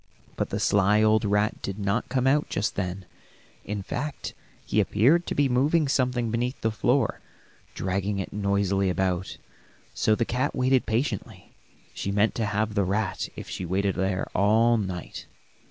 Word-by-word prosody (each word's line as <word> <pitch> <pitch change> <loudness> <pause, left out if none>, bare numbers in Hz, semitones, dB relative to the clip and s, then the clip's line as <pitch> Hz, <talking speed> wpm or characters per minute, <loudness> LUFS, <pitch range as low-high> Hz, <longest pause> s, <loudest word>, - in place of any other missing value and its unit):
But - - -2
the - - -2
sly 100 +2 +3
old 110 0 +4
rat 105 +1 +1
did 95 0 -4
not 100 +3 -1
come 130 0 0
out 145 +3 +2
just 100 - -1
then; 95 -1 -3 0.6
in 105 -1 -4
fact 145 +7 -4 0.3
he - - +1
appeared 155 - +3
to - - -2
be 145 -1 +3
moving 145 +5 +2
something 125 -4 0
beneath 120 +3 -1
the 110 - +1
floor, 120 +5 +1 0.6
dragging 95 +2 -1
it 95 - -4
noisily 100 -1 +1
about. 90 0 -1 0.6
So 110 - +2
the 115 - 0
cat 130 +5 -1
waited 130 0 +2
patiently; 115 -2 -3 0.4
she 100 - -3
meant 105 +2 +2
to 110 -3 -1
have 105 +1 -1
the 100 -1 +2
rat 100 +2 -1
if - - -8
she - - -5
waited 95 +2 0
there 95 0 -1
all 110 +4 +4
night. 95 -5 -4
105 Hz, 165 wpm, -26 LUFS, 100-125 Hz, 0.6 s, old